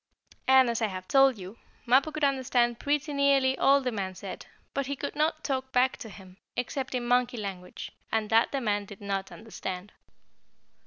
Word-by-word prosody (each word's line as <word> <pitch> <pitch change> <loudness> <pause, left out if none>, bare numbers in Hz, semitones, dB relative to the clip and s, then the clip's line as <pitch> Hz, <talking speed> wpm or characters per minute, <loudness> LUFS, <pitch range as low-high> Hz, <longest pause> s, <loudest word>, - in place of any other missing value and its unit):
And, 260 -1 +6
as 235 -1 -1
I 220 - +2
have 185 -2 -7
told 270 -3 +5
you, 190 +3 -10 0.3
Mappo 265 +6 +4
could 305 0 -5
understand 255 -4 +2
pretty 290 +1 -1
nearly 275 -2 +3
all 275 +2 +4
the 255 -1 -1
man 190 -4 -4
said, - - -8 0.3
but 275 -1 -2
he 280 - -2
could - - -5
not 310 +1 0
talk 265 -2 -2
back 255 0 +3
to 225 - -8
him, 185 -1 -13 0.2
except 260 +1 -3
in 245 -1 -2
monkey 245 0 +2
language, 190 -4 -6 0.2
and 220 -1 -1
that 225 +1 +4
the 275 - -1
man 205 -3 0
did 200 0 -11
not 195 -1 -3
understand. 200 -3 -7
245 Hz, 190 wpm, -28 LUFS, 205-270 Hz, 0.3 s, And